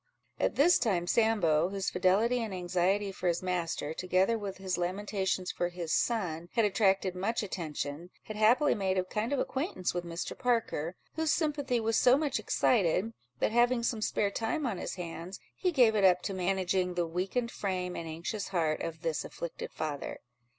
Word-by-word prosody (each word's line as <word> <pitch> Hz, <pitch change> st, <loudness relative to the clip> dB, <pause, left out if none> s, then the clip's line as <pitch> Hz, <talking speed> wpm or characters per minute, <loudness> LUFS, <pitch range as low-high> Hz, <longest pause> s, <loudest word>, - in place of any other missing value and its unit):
At -, -, +1 dB
this 340 Hz, +6 st, +5 dB
time 185 Hz, -7 st, +1 dB
Sambo, 180 Hz, -7 st, +3 dB
whose 195 Hz, -1 st, -2 dB
fidelity 210 Hz, +7 st, +2 dB
and 215 Hz, -4 st, -3 dB
anxiety 185 Hz, +3 st, 0 dB
for 185 Hz, -, -4 dB
his 175 Hz, +1 st, 0 dB
master, 170 Hz, -4 st, -2 dB
together 185 Hz, +6 st, +2 dB
with 205 Hz, -3 st, -5 dB
his 190 Hz, -1 st, -2 dB
lamentations 190 Hz, +1 st, -1 dB
for 175 Hz, -, -1 dB
his 175 Hz, -2 st, -4 dB
son, 175 Hz, -8 st, 0 dB
had 230 Hz, -3 st, +3 dB
attracted 195 Hz, -2 st, +2 dB
much 205 Hz, +6 st, -1 dB
attention, 160 Hz, -3 st, -4 dB
had 215 Hz, -, -7 dB
happily 240 Hz, +7 st, +4 dB
made 190 Hz, -3 st, 0 dB
a 185 Hz, -, +2 dB
kind 210 Hz, +6 st, -3 dB
of 285 Hz, -, +1 dB
acquaintance 265 Hz, -, -2 dB
with 175 Hz, 0 st, -2 dB
Mr. 170 Hz, 0 st, -5 dB
Parker, 225 Hz, -, 0 dB, 0.2 s
whose 320 Hz, 0 st, +1 dB
sympathy 285 Hz, -6 st, 0 dB
was 225 Hz, 0 st, +1 dB
so 250 Hz, +2 st, +6 dB
much 295 Hz, -1 st, 0 dB
excited, 210 Hz, -1 st, +2 dB, 0.3 s
that -, -, +1 dB
having 240 Hz, +1 st, +3 dB
some 230 Hz, -2 st, -1 dB
spare 205 Hz, -1 st, 0 dB
time 235 Hz, +9 st, -1 dB
on 210 Hz, -8 st, -2 dB
his -, -, -4 dB
hands, 175 Hz, +1 st, -6 dB, 0.2 s
he 365 Hz, -, 0 dB
gave 245 Hz, -8 st, +5 dB
it 205 Hz, -, +2 dB
up 180 Hz, -1 st, +5 dB
to 195 Hz, -, -2 dB
managing 185 Hz, -1 st, 0 dB
the 175 Hz, -1 st, +1 dB
weakened 190 Hz, +8 st, -2 dB
frame 180 Hz, -2 st, -3 dB
and 165 Hz, -, -5 dB
anxious 170 Hz, +6 st, -4 dB
heart 160 Hz, -5 st, 0 dB
of 165 Hz, 0 st, -5 dB
this 160 Hz, -3 st, -1 dB
afflicted 170 Hz, -, -6 dB
father. 150 Hz, -3 st, -4 dB
190 Hz, 180 wpm, -30 LUFS, 175-225 Hz, 0.3 s, so